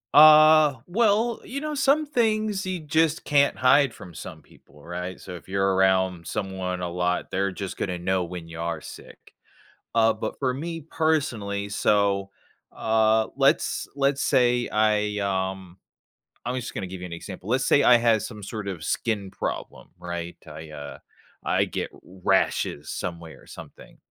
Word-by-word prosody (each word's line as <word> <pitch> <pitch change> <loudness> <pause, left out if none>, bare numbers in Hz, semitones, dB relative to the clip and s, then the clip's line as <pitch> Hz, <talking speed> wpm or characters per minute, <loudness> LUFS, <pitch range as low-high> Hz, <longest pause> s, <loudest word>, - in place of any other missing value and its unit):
Uh, 155 -2 +8
well, 225 +3 +2
you 275 +2 -5
know, 305 0 -4
some 280 +2 +3
things 215 -7 0
you 185 -2 -3
just 160 +1 +1
can't 140 -1 +3
hide 130 +1 +4
from 85 - -12
some 85 -1 -9
people, 75 - -21
right? 90 +2 -6
So, 90 -2 -9
if 90 - -13
you're 95 0 +1
around 95 -2 +2
someone 95 -2 -3
a 90 - -3
lot, 90 0 -1
they're 95 +1 0
just 95 0 -6
gonna 90 -3 -3
know 95 0 0
when 85 -1 -7
you 85 0 -8
are 85 -1 -2
sick. - - -13 0.6
Uh, 115 -1 +4
but 110 0 -5
for 130 -2 +1
me 165 +5 -5
personally, 135 -11 -1
so, 100 -1 +1 0.4
uh, 110 0 +2
let's - - +2
let's 140 0 +1
say 120 -1 +2
I, 105 -1 +1
um 95 -2 -3 0.7
I'm 125 +2 -2
just 120 -2 -5
gonna 95 - -4
give 90 0 -8
you 90 - -6
an 85 - -10
example, 95 +3 -9
let's 130 +2 +1
say 145 - +4
I 125 - +7
had 115 -2 +3
some 105 -1 -7
sort 100 0 -6
of 85 -4 -5
skin 105 -4 -2
problem, - - -5
right? 85 0 -6
I, 80 +1 -9
uh, 70 -1 -8 0.4
I - - +2
get - - -4
rashes 90 -4 -1
somewhere 85 -3 -6
or - - -20
something. - - -13
105 Hz, 165 wpm, -25 LUFS, 90-140 Hz, 0.7 s, Uh